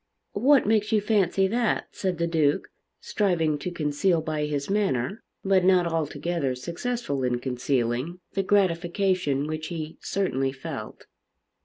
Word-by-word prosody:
"What 270 +6 +4
makes 215 0 +2
you 220 - +4
fancy 200 -3 +2
that?" 235 +1 0
said 185 -3 -2
the 170 - 0
Duke, 155 -4 +1 0.3
striving 165 -7 0
to 180 - -3
conceal 165 +1 +1
by 155 -1 -2
his 145 -2 -2
manner, 195 - 0 0.2
but 190 -1 +4
not 185 -1 +4
altogether 165 -3 -1
successful 170 - -3
in 125 -1 +1
concealing, 125 +4 -1
the 195 - +1
gratification 185 -5 +1
which 155 +1 -4
he 160 -2 -6
certainly 135 -9 -1
felt. 135 - -7
170 Hz, 135 wpm, -26 LUFS, 145-195 Hz, 0.3 s, What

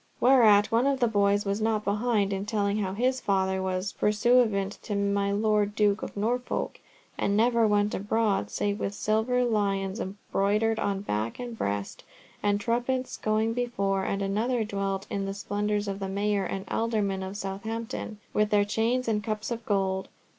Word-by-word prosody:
Whereat 220 -5 +5
one 235 +4 +3
of 275 -1 +1
the 245 - +4
other 225 - -2
boys 205 0 +3
was 200 +2 -1
not 215 -1 0
behind 205 -1 +1
in 195 +1 -3
telling 205 -1 0
how 190 -2 -2
his 255 +5 0
father 190 -1 +1
was 185 +1 -2
pursuivant 210 -2 +2
to 210 - -4
my 200 0 +1
Lord 210 0 +1
Duke 210 -1 +2
of - - -7
Norfolk, 240 +4 -2 0.4
and 200 +1 +1
never 230 0 +4
went 205 0 +2
abroad 205 0 0
save 205 +1 -1
with 200 - -3
silver 220 +4 +1
lions 200 -3 0 0.3
broidered 215 +3 +2
on 195 -1 -1
back 110 - -2
and 245 -2 -6
breast, 100 - -3 0.4
and 205 0 +1
trumpets 245 +4 -1
going 220 +1 0
before; 200 -6 -1
and 200 +1 -1
another 225 +5 0
dwelt 195 -2 -2
on 195 -1 -1
the 195 0 -4
splendours 205 +1 -1
of 195 0 -3
the 195 -1 -3
mayor 200 0 0
and 190 +2 -4
aldermen 210 -4 -1
of 190 +1 -5
Southampton 215 +2 -5 0.2
with 210 0 +2
their 205 -1 +3
chains 230 +4 0
and 210 -2 0
cups 215 +1 -3
of 235 0 -3
gold. 190 -2 0
205 Hz, 175 wpm, -27 LUFS, 200-225 Hz, 0.4 s, Whereat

